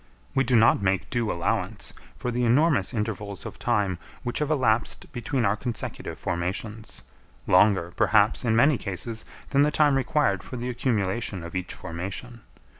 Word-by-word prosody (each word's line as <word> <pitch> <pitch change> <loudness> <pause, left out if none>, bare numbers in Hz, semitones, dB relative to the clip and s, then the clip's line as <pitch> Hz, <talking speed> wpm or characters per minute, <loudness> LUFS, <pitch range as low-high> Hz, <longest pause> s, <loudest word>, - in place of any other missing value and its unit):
We 135 -1 +3
do 125 -1 +1
not 110 -2 +5
make 95 -1 0
due 120 -3 0
allowance 85 - -2 0.2
for 125 - -3
the 125 +1 0
enormous 125 - +3
intervals 105 -3 -3
of - - -8
time 100 -7 0 0.2
which 120 -1 -2
have 150 -1 -1
elapsed 120 -7 +1
between 120 0 -1
our 100 +1 +2
consecutive 115 +1 -4
formations, 95 +6 -4 0.4
longer 90 -2 +4
perhaps 110 +2 +3
in 115 -2 +2
many 140 +3 +4
cases 110 +3 -3 0.3
than 140 - +4
the 145 - +4
time 150 -1 +3
required 130 -7 +1
for 125 - -8
the 120 +1 -3
accumulation 105 -6 -1
of 85 +2 -8
each 90 -1 -3
formation. 95 +8 -6
110 Hz, 160 wpm, -26 LUFS, 100-125 Hz, 0.4 s, not